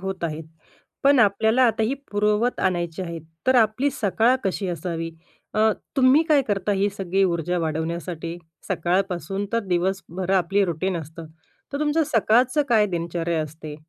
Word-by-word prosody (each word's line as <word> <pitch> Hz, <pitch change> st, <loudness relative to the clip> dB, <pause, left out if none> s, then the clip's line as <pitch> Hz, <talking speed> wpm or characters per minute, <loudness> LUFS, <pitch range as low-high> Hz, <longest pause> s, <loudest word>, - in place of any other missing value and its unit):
होत 190 Hz, -2 st, -4 dB
आहे, 155 Hz, -1 st, -3 dB, 0.6 s
पण 280 Hz, 0 st, +5 dB
आपल्याला 220 Hz, +4 st, +3 dB
आता 225 Hz, -1 st, +1 dB
ही 225 Hz, +5 st, +1 dB, 0.2 s
पुरवत 210 Hz, +3 st, +1 dB
आणायची 175 Hz, -1 st, -1 dB
आहे. 170 Hz, -2 st, -5 dB, 0.3 s
तर 260 Hz, -, +4 dB
आपली 235 Hz, +5 st, +3 dB
सकाळ 230 Hz, 0 st, +2 dB
कशी 195 Hz, 0 st, -1 dB
असावी? 165 Hz, -1 st, -4 dB, 0.4 s
अ, 220 Hz, +1 st, +4 dB, 0.3 s
तुम्ही 265 Hz, +3 st, +5 dB
काय 295 Hz, -3 st, +5 dB
करता 205 Hz, 0 st, 0 dB
ही 200 Hz, +1 st, +1 dB
सगळी 195 Hz, 0 st, 0 dB
ऊर्जा 175 Hz, 0 st, 0 dB
वाढवण्यासाठी 165 Hz, +1 st, -3 dB, 0.3 s
सकाळपासून 185 Hz, +2 st, -1 dB
तर 230 Hz, -, +2 dB
दिवसभर 185 Hz, 0 st, -2 dB
आपली 195 Hz, +2 st, +2 dB
रुटीन 180 Hz, +1 st, -2 dB
असतं. 160 Hz, +1 st, -8 dB, 0.5 s
तर 280 Hz, -, -2 dB
तुमचं 300 Hz, +2 st, +2 dB
सकाळचं 245 Hz, +5 st, +3 dB
काय 220 Hz, -3 st, +4 dB
दिनचर्या 170 Hz, -2 st, -2 dB
असते? 155 Hz, 0 st, -8 dB
190 Hz, 145 wpm, -23 LUFS, 170-220 Hz, 0.6 s, पण